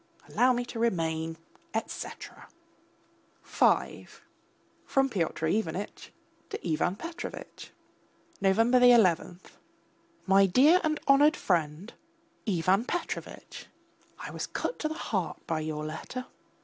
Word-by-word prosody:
Allow 255 +1 +3
me 245 0 -2
to 240 -1 -7
remain, 165 -7 -1 0.4
etc. 225 - -6 1.0
V - - +1 0.8
(FROM 270 0 +1
PYOTR 170 -6 -2
IVANITCH 185 +1 -2 0.4
TO - - -6
IVAN 165 +3 0
PETROVITCH) 335 - -8 0.7
November 225 +6 +4
11. 190 -8 +4 0.9
MY 195 0 +5
DEAR 290 - +5
AND 310 -1 0
HONOURED 290 +3 +5
FRIEND, 170 +2 -1 0.6
IVAN 185 +3 +2
PETROVITCH! 350 - -5 0.5
I - - -7
was - - -4
cut - - -4
to 310 - -1
the 310 - -5
heart 190 - -3
by 160 -1 -1
your 155 -1 -4
letter. 160 +11 -6
195 Hz, 110 wpm, -29 LUFS, 165-255 Hz, 1.0 s, MY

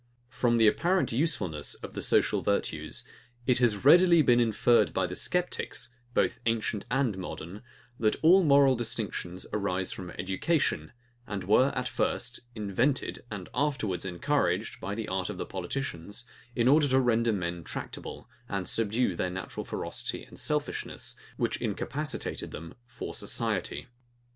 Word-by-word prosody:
From 120 -2 +1
the 115 -1 +6
apparent 180 - +2
usefulness 115 - -1
of - - -9
the - - -4
social - - +3
virtues, - - -1 0.4
it 125 -1 +3
has 120 -2 +2
readily 170 +1 +7
been 120 -2 +5
inferred 115 -1 +3
by 95 - +2
sceptics, 125 - -1 0.3
both - - +2
ancient 110 -2 0
and 125 -6 +1
modern, 90 +2 -7 0.4
that 110 -1 +2
all 180 +4 +7
moral 140 -3 +6
distinctions 110 -6 -2
arise 95 -3 0
from 90 -2 -6
education, 95 - 0 0.4
and 100 -3 -4
were, 125 +8 +4
at 125 -1 -1
first, 120 0 -1 0.2
invented, 115 +6 0
and 100 -4 -6
afterwards 125 -9 0
encouraged, 90 -3 0
by 100 - -3
the 110 0 -4
art 95 -1 -2
of - - -5
politicians, 105 -4 -4 0.3
in 120 -1 +2
order 145 +2 +5
to 130 0 +4
render 115 -2 +3
men 85 -4 -3
tractable, - - -7 0.2
and 100 -3 -2
subdue 115 0 +2
their 90 - -1
natural 95 +1 -5
ferocity - - -4
and - - -10
selfishness, - - -2 0.2
which - - -1
incapacitated 150 0 -2
them 85 +1 -8
for 120 -1 -7
society. - - -1
115 Hz, 140 wpm, -29 LUFS, 95-130 Hz, 0.4 s, readily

